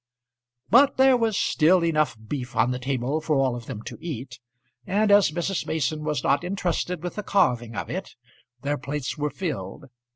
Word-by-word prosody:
But 270 +4 +6
there 265 0 +6
was 225 -4 +1
still 170 +2 +3
enough 155 -7 +1
beef 130 -2 -5
on 125 - +3
the 125 - -3
table 135 +3 -1
for 155 -1 0
all 135 -3 +2
of 120 -2 -8
them 105 - -6
to - - -8
eat, 125 -6 -6 0.5
and 205 +2 +2
as 200 -3 +6
Mrs. 175 +4 -2
Mason 155 0 -1
was 150 -1 -2
not 140 - +2
intrusted 180 -2 -2
with 180 - -5
the - - -1
carving 125 - +1
of - - -4
it, - - -6 0.5
their 145 +1 -1
plates 145 0 -4
were 150 -1 -1
filled. 140 - -5
150 Hz, 185 wpm, -25 LUFS, 130-180 Hz, 0.5 s, But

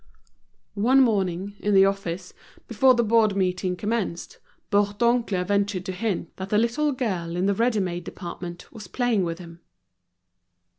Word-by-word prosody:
One 255 +5 +5
morning, 195 -5 0
in 205 -1 +1
the 195 0 +7
office, 185 -2 -3 0.3
before 255 +3 +4
the 235 - +2
board 220 -2 +3
meeting 185 -1 0
commenced, 205 -2 -3 0.3
Bourdoncle 205 -1 +1
ventured 200 -1 0
to 190 - -3
hint 185 -3 -3
that 190 +1 -6
the 210 - +2
little 240 +7 +1
girl 185 -10 -3
in 180 +2 0
the 200 - +2
ready 230 +1 +1
made 175 -2 -3
department 175 0 -8
was 215 -4 -10
playing 240 -4 0
with 165 -1 -3
him. 170 -1 -12
200 Hz, 150 wpm, -24 LUFS, 180-230 Hz, 0.3 s, the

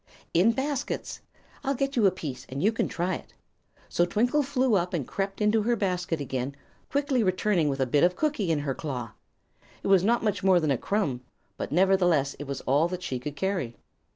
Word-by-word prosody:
"In 185 +7 +5
baskets. 275 +2 -3 0.4
I'll 275 0 0
get 275 +2 -1
you 220 -5 +5
a - - +4
piece, 150 -8 -6
and 135 +3 -4
you 210 - +4
can 225 - -1
try 180 +2 -1
it." - - -8 0.5
So 175 - +1
Twinkle 240 +11 +2
flew 260 -3 +1
up 180 -2 +1
and 145 -7 -2
crept 195 0 -3
into 210 +1 +3
her 235 +3 +2
basket 180 -5 -1
again, 135 -1 -3 0.3
quickly 280 -3 +1
returning 185 -4 +2
with 135 -1 -2
a 130 - +3
bit 140 +3 +2
of 180 +1 +4
cookie 285 - 0
in 150 -2 +1
her 140 -2 -1
claw. 125 -6 -5 0.7
It - - -2
was 190 -2 +5
not 235 +3 +2
much 205 -3 0
more 190 -2 +5
than 155 -3 +1
a 135 - +2
crumb, 155 -12 -1 0.3
but - - -5
nevertheless 175 -5 +3
it 145 - -5
was 140 -1 -4
all 145 +5 +2
that 180 0 -5
she 130 -7 -3
could 145 +3 -6
carry. 175 -8 -2
185 Hz, 210 wpm, -27 LUFS, 145-215 Hz, 0.7 s, In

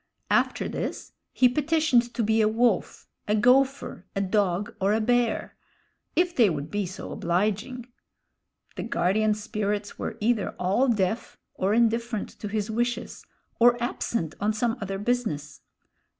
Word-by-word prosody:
After - - +2
this - - -4 0.2
he 255 - +5
petitioned 285 -3 +2
to 235 - 0
be 220 +1 +3
a 215 - +4
wolf, 225 -2 0 0.2
a 210 - +2
gophir, 260 -1 +2
a 195 - 0
dog, 195 -1 0
or 195 +2 +3
a 220 - +2
bear 240 +1 +1 0.6
if 350 0 +2
they 230 -5 +5
would 150 -2 -4
be 205 -2 -1
so 185 +4 -8
obliging. 215 +8 -1 0.9
The - - -2
guardian 210 +4 +1
spirits 210 -1 -3
were - - -4
either 220 -1 0
all 200 +9 +2
deaf, 220 -1 -1 0.2
or 195 +3 0
indifferent 230 -1 +1
to 210 - -5
his 210 +1 -2
wishes, 240 +2 -2 0.4
or 240 +1 +6
absent 230 -7 -2
on 210 +1 +1
some 225 +1 0
other 195 -1 -3
business. 195 -10 -2
215 Hz, 145 wpm, -26 LUFS, 200-240 Hz, 0.9 s, or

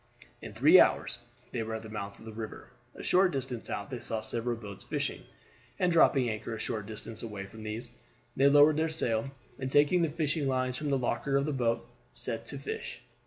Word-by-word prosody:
In - - -7
three - - +8
hours - - +3 0.3
they 120 - -2
were 110 0 -3
at 110 - -6
the - - -8
mouth 100 -2 -6
of - - -14
the 110 - -7
river. 110 0 -7 0.2
A - - -8
short 185 +1 +4
distance 130 -4 -4
out 100 - -4
they 125 - -4
saw 110 -1 -2
several 115 +2 -2
boats 105 -4 -9
fishing, - - -2 0.6
and 180 - +2
dropping 140 -6 +5
anchor 110 0 -3
a - - -7
short 105 -2 -3
distance 110 0 -7
away 105 -4 -5
from 110 +3 -12
these, 110 +3 -5 0.4
they 135 - +5
lowered 145 +1 +7
their 160 +1 +2
sail, 125 -6 -1 0.3
and 130 -1 -3
taking 145 +5 +5
the 165 - +2
fishing 150 -1 -1
lines 130 -1 0
from 150 +3 -3
the 140 - +3
locker 135 +2 -1
of 140 0 +3
the 150 - -1
boat, 115 -3 0 0.3
set - - -4
to - - -5
to - - -10
fish. - - -5
120 Hz, 215 wpm, -30 LUFS, 110-145 Hz, 0.6 s, three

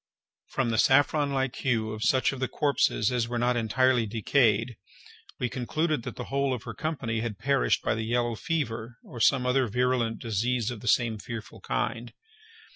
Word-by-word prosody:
From 125 -3 -1
the 110 - +1
saffron 145 +2 +3
like 135 -2 -1
hue 115 -4 0
of 110 0 -6
such 130 +2 +3
of 135 - -7
the 130 - 0
corpses 140 -6 +1
as 120 -2 0
were 120 0 -3
not 120 +1 +1
entirely 120 +1 +2
decayed, 115 +1 +2 0.6
we 125 - -1
concluded 155 +4 -1
that - - -7
the 125 - -5
whole 140 0 0
of 115 - -9
her - - -6
company 135 -8 -3
had 110 -3 -4
perished 140 +3 +1
by - - +1
the 110 - -3
yellow 120 +1 0
fever, 120 -4 -3
or 120 - -10
some 125 +3 +3
other 125 0 +2
virulent 125 0 0
disease 115 +1 -1
of 120 - -6
the 120 - -9
same 115 -1 +2
fearful 115 0 -8
kind. 115 +1 -3
120 Hz, 185 wpm, -27 LUFS, 115-130 Hz, 0.6 s, saffron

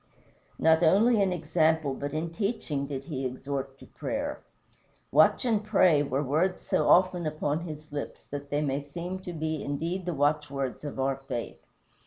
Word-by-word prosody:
Not 160 0 +4
only 205 +7 +5
in 195 -2 +2
example 160 -3 +1
but 140 +2 -4
in 160 +2 -3
teaching 170 - -2
did 135 -1 -4
he 135 -5 -4
exhort 135 +1 -4
to - - -14
prayer. 285 +1 -4 0.7
"Watch - - +5
and 220 -3 +2
pray" 185 -8 +4
were 140 0 0
words 160 +7 0
so - - +1
often 180 -2 +4
upon 150 0 -1
his 155 0 -9
lips 145 -1 -6
that 140 0 -7
they 145 +1 0
may 140 0 -1
seem 170 +6 -6
to 185 -1 -7
be 155 -2 -3
indeed 165 +6 -3
the 175 - -1
watchwords 145 -2 0
of 145 -2 -6
our 135 0 +1
faith. 130 -3 -6
155 Hz, 170 wpm, -28 LUFS, 140-175 Hz, 0.7 s, only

